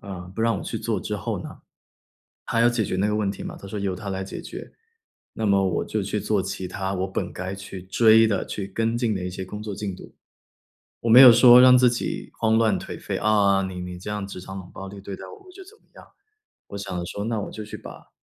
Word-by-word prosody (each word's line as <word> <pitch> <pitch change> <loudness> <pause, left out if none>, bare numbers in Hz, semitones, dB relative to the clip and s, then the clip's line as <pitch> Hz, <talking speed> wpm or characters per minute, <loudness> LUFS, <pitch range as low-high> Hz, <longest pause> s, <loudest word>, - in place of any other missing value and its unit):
啊， 95 -4 -7
不 - - -5
让 115 -2 +2
我 - - -7
去 - - -4
做 - - -2
之 - - -4
后 - - -3
呢。 - - -10 0.9
他 115 0 +2
要 120 - +6
解 120 -2 0
决 95 - -2
那 100 +3 +1
个 105 - 0
问 105 -2 0
题 100 - -7
嘛， - - -7
他 100 - -10
说 105 - -5
由 100 -2 -2
他 100 +1 -7
来 95 0 -3
解 - - -7
决。 - - -9 0.6
那 110 - -3
么 100 -1 +3
我 - - -1
就 110 - -2
去 105 +2 -2
做 100 -1 0
其 95 -1 -5
它 95 +1 -4
我 95 +1 -1
本 95 - -4
该 95 +1 -5
去 95 -1 -9
追 110 +4 +5
的、 100 -4 0
去 100 - -5
跟 115 +4 -1
进 115 -3 0
的 90 -2 -4
一 90 - -3
些 95 +1 -6
工 105 +3 -8
作 105 -2 -5
进 100 -2 -4
度。 - - -13 0.9
我 115 - -1
没 125 +3 +9
有 125 -3 +11
说 120 +1 +8
让 125 0 +8
自 125 0 +5
己 120 - -4
慌 110 -1 +2
乱 110 -1 +2
颓 - - -8
废， - - -3
“啊， 100 -2 +3
你 95 -1 -5
你 90 0 -7
这 95 - -9
样 105 -1 -3
职 95 -2 -8
场 95 +1 -9
冷 90 - -13
暴 95 - -8
力 100 +1 -10
对 100 0 -7
待 - - -10
我， 400 -3 -14
我 - - -14
就 380 +1 -12
怎 420 +4 -17
么 - - -36
样”， - - -14 0.6
我 100 - -6
想 95 -3 -4
说： 100 +3 -5
“那 115 -2 -1
我 - - -6
就 110 - -7
去 105 - -8
把 - - -12
100 Hz, 285 characters per minute, -24 LUFS, 95-115 Hz, 0.9 s, 有